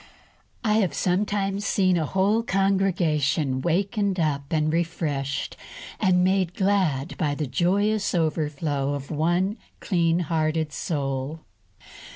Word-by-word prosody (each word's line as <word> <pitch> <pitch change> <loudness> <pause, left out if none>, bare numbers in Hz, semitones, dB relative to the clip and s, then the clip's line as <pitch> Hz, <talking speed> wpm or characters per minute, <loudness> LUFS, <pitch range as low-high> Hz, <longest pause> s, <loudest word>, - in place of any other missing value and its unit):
I 215 -2 +2
have 190 -6 0
sometimes 195 +1 0
seen 185 -2 +2
a 160 -3 0
whole 200 +6 +2
congregation 170 - +1
wakened 195 - 0
up 145 -3 0
and 155 -1 +1
refreshed 155 -5 -2 0.4
and 180 -3 +3
made 185 -2 +1
glad 185 -7 +1
by 150 -4 0
the 150 - -2
joyous 200 +9 +1
overflow 150 -3 -1
from 140 +2 -6
one 175 +7 +1 0.2
clean 170 -2 +1
hearted 155 -1 -1
soul. 140 -1 -3
170 Hz, 115 wpm, -25 LUFS, 150-195 Hz, 0.4 s, and